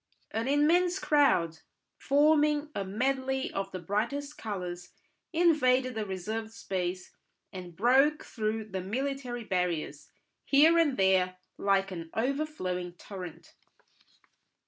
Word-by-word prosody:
An 225 Hz, +2 st, -2 dB
immense 340 Hz, +6 st, +3 dB
crowd, 185 Hz, -, +2 dB, 0.4 s
forming 300 Hz, +1 st, +3 dB
a 200 Hz, -, -2 dB
medley 265 Hz, +6 st, -1 dB
of 195 Hz, 0 st, -3 dB
the -, -, -4 dB
brightest 235 Hz, -, -2 dB
colours, 180 Hz, -4 st, -6 dB, 0.4 s
invaded 265 Hz, -7 st, +3 dB
the 220 Hz, -2 st, -3 dB
reserved 215 Hz, +4 st, -4 dB
space 185 Hz, -4 st, -4 dB, 0.4 s
and 180 Hz, -2 st, -8 dB
broke 270 Hz, -, +3 dB
through 220 Hz, -1 st, -2 dB
the 190 Hz, -1 st, -3 dB
military 250 Hz, +3 st, -3 dB
barriers, 170 Hz, -6 st, -2 dB, 0.3 s
here 315 Hz, +4 st, +5 dB
and 295 Hz, -5 st, +2 dB
there, 185 Hz, -1 st, +3 dB, 0.2 s
like 195 Hz, -1 st, +2 dB
an 165 Hz, -3 st, -6 dB
overflowing 225 Hz, -, -2 dB
torrent. 180 Hz, -2 st, -10 dB
225 Hz, 110 wpm, -29 LUFS, 185-280 Hz, 0.4 s, here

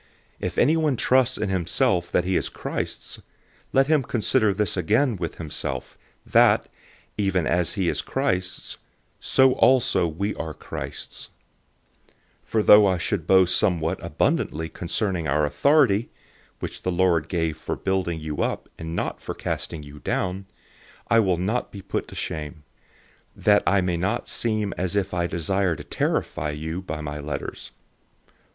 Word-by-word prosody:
If -, -, -4 dB
anyone 155 Hz, 0 st, +3 dB
trusts 130 Hz, +1 st, +2 dB
in -, -, -2 dB
himself 90 Hz, -1 st, +1 dB
that 90 Hz, -, +2 dB
he 95 Hz, +1 st, 0 dB
is -, -, 0 dB
Christ's, -, -, -5 dB, 0.5 s
let 135 Hz, 0 st, +4 dB
him 155 Hz, 0 st, +3 dB
consider 110 Hz, -3 st, +2 dB
this 100 Hz, 0 st, 0 dB
again 110 Hz, -, +2 dB
with 85 Hz, -3 st, -4 dB
himself, 80 Hz, -3 st, -5 dB, 0.3 s
that, -, -, +4 dB, 0.5 s
even 95 Hz, -4 st, +1 dB
as 85 Hz, +1 st, +1 dB
he 95 Hz, -4 st, -1 dB
is -, -, +1 dB
Christ's, 90 Hz, 0 st, -2 dB, 0.4 s
so 130 Hz, 0 st, +4 dB
also 125 Hz, -10 st, +3 dB
we 100 Hz, +6 st, -2 dB
are 80 Hz, -2 st, -5 dB
Christ's. -, -, -7 dB, 1.1 s
010:008 -, -, -29 dB
For 110 Hz, -1 st, +1 dB
though 105 Hz, -1 st, +8 dB
I 95 Hz, -1 st, +2 dB
should 85 Hz, -1 st, -2 dB
boast 95 Hz, -1 st, +5 dB
somewhat 85 Hz, -4 st, 0 dB
abundantly 80 Hz, +2 st, 0 dB
concerning 90 Hz, -1 st, -2 dB
our 75 Hz, +1 st, +2 dB
authority, 120 Hz, -, +3 dB, 0.5 s
(which -, -, -5 dB
the 90 Hz, -, -1 dB
Lord 85 Hz, -3 st, +2 dB
gave 80 Hz, -3 st, -1 dB
for 80 Hz, -, -4 dB
building 95 Hz, -4 st, -1 dB
you 75 Hz, -1 st, -4 dB
up, -, -, -2 dB
and 80 Hz, 0 st, -5 dB
not -, -, -3 dB
for -, -, -5 dB
casting 80 Hz, -2 st, -4 dB
you 75 Hz, 0 st, -11 dB
down) 95 Hz, +4 st, -2 dB, 0.6 s
I 115 Hz, -, +5 dB
will 95 Hz, -5 st, +2 dB
not 105 Hz, +8 st, -1 dB
be 100 Hz, -, -8 dB
disappointed, -, -, -3 dB
010:009 75 Hz, -2 st, -4 dB, 0.8 s
that 105 Hz, -1 st, +4 dB
I 100 Hz, -1 st, +4 dB
may 90 Hz, -1 st, 0 dB
not 95 Hz, +4 st, -1 dB
seem 110 Hz, -3 st, 0 dB
as 90 Hz, +1 st, -1 dB
if 100 Hz, -2 st, 0 dB
I 85 Hz, -1 st, 0 dB
desire 90 Hz, +1 st, 0 dB
to -, -, -9 dB
terrify 75 Hz, -, -1 dB
you 80 Hz, +4 st, -4 dB
by 80 Hz, -5 st, -5 dB
my 75 Hz, 0 st, -5 dB
letters. 75 Hz, +1 st, -5 dB
90 Hz, 155 wpm, -24 LUFS, 80-105 Hz, 1.1 s, though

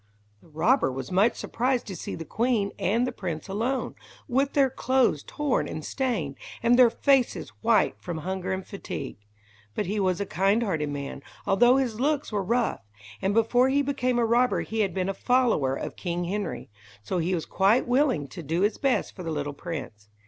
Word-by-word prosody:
The -, -, -20 dB
robber 165 Hz, -, +2 dB
was 130 Hz, 0 st, -6 dB
much 195 Hz, +6 st, +3 dB
surprised 250 Hz, +1 st, -1 dB
to 195 Hz, -, -6 dB
see -, -, -5 dB
the 165 Hz, -, -7 dB
queen 220 Hz, 0 st, 0 dB
and 230 Hz, +6 st, +2 dB
the 255 Hz, -, -2 dB
prince 175 Hz, -8 st, -5 dB
alone, 230 Hz, +7 st, -1 dB, 0.3 s
with 270 Hz, +1 st, +1 dB
their 275 Hz, -3 st, +3 dB
clothes 255 Hz, -, +2 dB
torn 290 Hz, -, -1 dB
and 155 Hz, -, -6 dB
stained, 210 Hz, -, -2 dB, 0.3 s
and 240 Hz, +1 st, +5 dB
their 245 Hz, -2 st, +8 dB
faces 270 Hz, +1 st, +1 dB
white 225 Hz, -1 st, +3 dB
from 175 Hz, -2 st, -5 dB
hunger 185 Hz, +3 st, -3 dB
and 190 Hz, 0 st, -3 dB
fatigue. 140 Hz, -, -6 dB, 0.6 s
But -, -, -1 dB
he 205 Hz, +4 st, -2 dB
was 185 Hz, -3 st, +1 dB
a 200 Hz, -, -1 dB
kindhearted 190 Hz, -4 st, +1 dB
man, 140 Hz, -1 st, -5 dB, 0.2 s
although 240 Hz, +6 st, +5 dB
his 240 Hz, -5 st, -1 dB
looks 290 Hz, +1 st, 0 dB
were 205 Hz, -2 st, 0 dB
rough, 235 Hz, +5 st, 0 dB, 0.4 s
and 195 Hz, +2 st, 0 dB
before 245 Hz, +3 st, +4 dB
he 285 Hz, +1 st, +2 dB
became 255 Hz, -3 st, 0 dB
a 235 Hz, -, +3 dB
robber 240 Hz, +2 st, +2 dB
he 225 Hz, -, -4 dB
had 200 Hz, -3 st, +1 dB
been 185 Hz, -1 st, 0 dB
a 195 Hz, -, -1 dB
follower 225 Hz, -, +2 dB
of -, -, -5 dB
King 175 Hz, -1 st, -3 dB
Henry, 195 Hz, -, -4 dB, 0.3 s
so 180 Hz, -, -2 dB
he 175 Hz, +3 st, 0 dB
was 165 Hz, -, -3 dB
quite 200 Hz, +7 st, +2 dB
willing 250 Hz, -, +2 dB
to 170 Hz, -, -8 dB
do 165 Hz, +3 st, -1 dB
his 205 Hz, +2 st, +1 dB
best 270 Hz, -2 st, 0 dB
for 185 Hz, -, -8 dB
the 165 Hz, -, -4 dB
little 145 Hz, -2 st, -3 dB
prince. 135 Hz, -, -7 dB
205 Hz, 190 wpm, -26 LUFS, 170-250 Hz, 0.6 s, their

